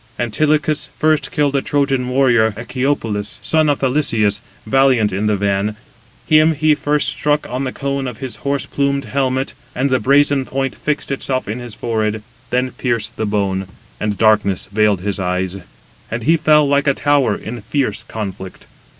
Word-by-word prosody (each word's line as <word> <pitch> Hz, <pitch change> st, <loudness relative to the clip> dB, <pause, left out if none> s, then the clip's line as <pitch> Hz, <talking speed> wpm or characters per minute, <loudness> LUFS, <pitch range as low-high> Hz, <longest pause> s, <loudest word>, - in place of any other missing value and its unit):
Antilochus 150 Hz, +5 st, 0 dB
first 155 Hz, -1 st, +2 dB
killed 145 Hz, -1 st, +1 dB
a 140 Hz, -, +2 dB
Trojan 135 Hz, -3 st, 0 dB
warrior, 120 Hz, -5 st, +3 dB
Echepolus, 115 Hz, -4 st, -2 dB
son 155 Hz, -1 st, +2 dB
of 145 Hz, -, 0 dB
Thalysias, 125 Hz, -7 st, +1 dB, 0.2 s
valiant 130 Hz, -6 st, +3 dB
in 100 Hz, +3 st, 0 dB
the 105 Hz, -1 st, +2 dB
van. 100 Hz, +1 st, 0 dB, 0.5 s
Him 155 Hz, +1 st, +4 dB
he 155 Hz, +1 st, +3 dB
first 150 Hz, 0 st, 0 dB
struck 150 Hz, 0 st, 0 dB
on 130 Hz, +2 st, -3 dB
the 130 Hz, -, -2 dB
cone 140 Hz, 0 st, -3 dB
of 125 Hz, -3 st, -6 dB
his 130 Hz, 0 st, -6 dB
horse 140 Hz, -1 st, -2 dB
plumed 140 Hz, 0 st, -1 dB
helmet, 130 Hz, -1 st, -1 dB, 0.2 s
and 135 Hz, +2 st, 0 dB
the 130 Hz, -, +3 dB
brazen 140 Hz, 0 st, +3 dB
point 135 Hz, 0 st, -2 dB
fixed 150 Hz, -2 st, -3 dB
itself 135 Hz, -1 st, -1 dB
in 110 Hz, +4 st, -4 dB
his 120 Hz, -3 st, -8 dB
forehead, 110 Hz, -2 st, -2 dB, 0.3 s
then 125 Hz, +1 st, 0 dB
pierced 115 Hz, -4 st, -2 dB
the 110 Hz, -, -2 dB
bone, 100 Hz, -2 st, -1 dB, 0.3 s
and 105 Hz, -2 st, -2 dB
darkness 105 Hz, -3 st, +2 dB
veiled 105 Hz, -3 st, +2 dB
his 100 Hz, 0 st, -2 dB
eyes; 90 Hz, 0 st, -1 dB, 0.5 s
and 115 Hz, 0 st, -4 dB
he 160 Hz, +6 st, +4 dB
fell, 150 Hz, -2 st, +4 dB
like 140 Hz, +1 st, +2 dB
a 140 Hz, -, +3 dB
tower, 140 Hz, -6 st, +2 dB
in 120 Hz, +1 st, -7 dB
fierce 110 Hz, -1 st, -1 dB
conflict. 95 Hz, -3 st, -6 dB
130 Hz, 165 wpm, -18 LUFS, 105-140 Hz, 0.5 s, Him